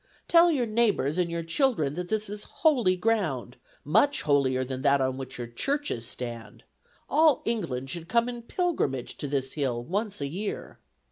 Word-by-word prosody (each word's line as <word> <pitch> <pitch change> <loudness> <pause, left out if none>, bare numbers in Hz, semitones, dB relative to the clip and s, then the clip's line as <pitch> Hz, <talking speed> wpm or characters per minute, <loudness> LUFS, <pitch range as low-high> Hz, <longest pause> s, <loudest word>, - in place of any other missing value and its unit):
Tell 340 0 +6
your 265 -6 +1
neighbors 215 - +1
and 175 -1 +1
your 170 0 -3
children 165 - +1
that 175 +2 -5
this 215 -1 0
is 205 +1 -6 0.2
holy 245 -12 +4
ground; 175 - -1 0.3
much 280 - +3
holier 135 -3 +2
than 130 0 -5
that 140 0 +4
on 130 -1 0
which 130 0 -7
your 120 - -4
churches 120 - -2
stand. 120 -2 -7 0.4
All 305 -1 +4
England 135 - -2
should 165 +1 -6
come 235 +1 +3
in 240 -1 -5
pilgrimage 235 - -1
to 145 - -4
this 135 -1 -2
hill 130 -5 -1
once 205 - -3
a 140 - -2
year.' 195 +8 -5
170 Hz, 175 wpm, -27 LUFS, -, 0.4 s, Tell